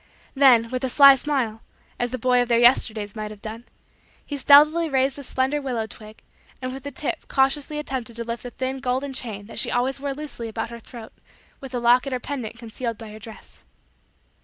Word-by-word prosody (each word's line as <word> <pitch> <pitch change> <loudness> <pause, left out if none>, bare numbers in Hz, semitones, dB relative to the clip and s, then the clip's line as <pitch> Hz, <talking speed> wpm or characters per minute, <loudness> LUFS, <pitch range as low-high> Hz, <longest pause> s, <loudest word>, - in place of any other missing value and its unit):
Then, 250 -5 +5
with 255 +1 -3
a 260 - 0
sly 275 +1 +8
smile, 255 -6 -2 0.4
as 245 - 0
the 255 - -4
boy 250 +1 +2
of 245 - -1
their 235 -1 +3
Yesterdays 225 -4 +3
might 215 -1 -5
have 210 -1 -11
done, 225 +2 -7 0.6
he 290 - -5
stealthily 300 +4 +5
raised 270 -1 +1
the 285 - -8
slender 265 +2 -1
willow 245 -5 -2
twig 215 0 -13 0.4
and 255 0 -5
with 270 - -7
the 285 - -6
tip 305 +3 -2
cautiously 275 +2 +1
attempted 260 -5 -4
to 235 - -4
lift 235 0 -5
the 245 - -7
thin 260 +2 -4
golden 260 +1 -2
chain 215 -6 -4
that 225 - -6
she - - +1
always 255 +3 0
wore 280 -1 -3
loosely 280 -6 -7
about 225 +1 -4
her 235 - -8
throat 230 0 -12 0.5
with 265 -2 -10
the 245 - -1
locket 245 +3 +3
or 250 - -1
pendant 245 -4 -6
concealed 230 0 -5
by 220 -1 -10
her 215 - -10
dress. 220 +1 -13
250 Hz, 210 wpm, -23 LUFS, 230-270 Hz, 0.6 s, sly